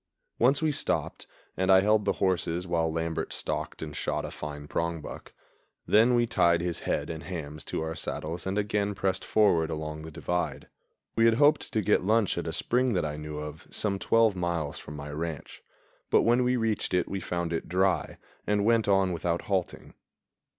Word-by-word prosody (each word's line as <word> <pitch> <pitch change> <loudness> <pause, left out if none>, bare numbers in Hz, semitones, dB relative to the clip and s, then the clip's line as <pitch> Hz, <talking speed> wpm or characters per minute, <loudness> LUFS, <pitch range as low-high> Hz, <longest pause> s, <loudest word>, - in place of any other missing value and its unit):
Once 135 +5 +4
we 155 - +3
stopped, 145 - -2 0.3
and 95 +1 +2
I 95 0 +7
held 105 +1 +3
the - - +2
horses 90 -2 0
while 85 -2 0
Lambert 80 0 -2
stalked - - -3
and 75 -1 -7
shot - - -2
a - - -6
fine 75 -1 -7
prongbuck; 85 0 -4 0.5
then 115 +4 +5
we 120 0 +3
tied 85 -7 +3
his 85 -1 -2
head - - -2
and 80 -1 -6
hams 75 -5 -6
to - - -3
our 80 0 -3
saddles 80 +2 -4
and 95 +2 -1
again 105 0 0
pressed 95 -1 -1
forward 85 -7 +3
along 75 -1 -4
the 80 - -8
divide. 90 +3 -3 0.5
We 115 - +4
had 115 -1 +5
hoped 145 +4 +3
to 110 - +2
get 105 0 +3
lunch 110 +1 +2
at - - -4
a - - -1
spring 125 0 +1
that 90 -4 0
I 75 -1 -3
knew 75 0 -6
of 75 +1 -7
some 100 -2 -1
twelve 115 -2 +3
miles 85 -5 -2
from 75 - -9
my 75 0 -7
ranch, 80 0 -5 0.5
but - - +4
when 120 +2 +3
we 125 +1 +2
reached 110 -5 0
it 90 - +1
we 95 - -3
found 85 -2 -3
it 80 - -3
dry 95 +1 +1 0.3
and 105 -1 +2
went 115 -1 +3
on 95 -2 +3
without 85 0 -1
halting. 95 -3 -2
90 Hz, 190 wpm, -28 LUFS, 80-105 Hz, 0.5 s, I